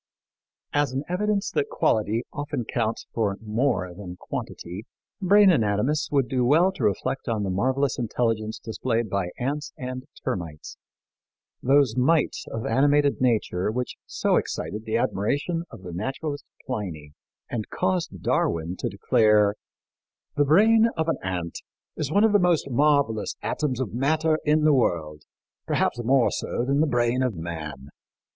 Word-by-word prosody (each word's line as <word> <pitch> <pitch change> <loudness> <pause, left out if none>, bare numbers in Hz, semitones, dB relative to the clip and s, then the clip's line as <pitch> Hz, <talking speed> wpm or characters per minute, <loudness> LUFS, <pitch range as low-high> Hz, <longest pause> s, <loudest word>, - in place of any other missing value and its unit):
As 145 -3 +1
an 135 +2 -2
evidence 200 +2 0
that 140 - 0
quality 110 +2 +1
often 145 -5 -3
counts 115 -1 -2
for 105 -4 0
more 110 -4 -1
than 90 -1 -8
quantity, 90 +6 -6 0.3
brain 200 +1 +6
anatomists 120 - +1
would 135 -3 +2
do 130 -2 0
well 160 +9 +4
to 190 - -6
reflect 110 +6 -1
on 110 -3 0
the 95 - -1
marvelous 130 +7 0
intelligence 115 -2 -1
displayed 115 -1 -2
by 100 -3 0
ants 140 +4 -3
and 130 0 -5 0.2
termites, 85 -5 -4 0.9
those 135 -3 +3
mites 145 +5 +1
of 115 - -4
animated 145 +4 +3
nature 110 -7 +1
which 125 +3 -3
so - - +1
excited 110 +2 -3
the 110 +1 0
admiration 145 - -1
of 105 -4 -12
the 90 - -7
naturalist 140 - -4 0.2
Pliny 90 - -5 0.4
and 110 -3 -3
caused 180 - -2
Darwin 85 +2 0
to - - -2
declare, 105 -2 +3 0.8
"The 145 - +3
brain 220 +9 +5
of 160 0 0
an - - +1
ant 90 -3 -3 0.4
is 150 -2 -3
one 205 +4 +4
of 220 -1 +4
the 205 - +6
most 175 -5 +2
marvelous 140 -5 +2
atoms 135 -5 -1
of 125 -6 -3
matter 155 +5 +1
in 150 +1 +3
the 155 -1 +5
world, 80 - 0 0.4
perhaps 120 - 0
more 130 +1 +3
so 120 - -2
than 140 +2 +1
the 160 - +3
brain 120 -1 +1
of 125 -5 0
man." 80 -5 -6
125 Hz, 150 wpm, -25 LUFS, 105-145 Hz, 0.9 s, brain